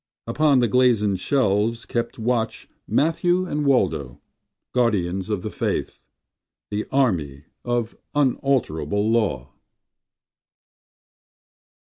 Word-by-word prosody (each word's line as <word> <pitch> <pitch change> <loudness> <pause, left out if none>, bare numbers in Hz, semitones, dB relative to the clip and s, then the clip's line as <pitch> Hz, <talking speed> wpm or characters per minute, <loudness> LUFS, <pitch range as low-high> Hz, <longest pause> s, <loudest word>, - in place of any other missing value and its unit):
Upon 145 +4 +3
the 120 -1 +3
glazen 115 -5 +3
shelves 115 +1 0
kept 120 -1 -3
watch 115 0 -1 0.2
Matthew 175 +4 +1
and 150 -4 -2
Waldo, 80 - +1 0.5
guardians 95 -6 0
of 105 -4 -2
the - - -4
faith, - - -3 0.7
The 105 +1 -2
army 80 - 0 0.2
of 120 -2 -2 0.2
unalterable 110 - +1
law. 85 - 0
115 Hz, 90 wpm, -23 LUFS, 95-130 Hz, 0.7 s, Upon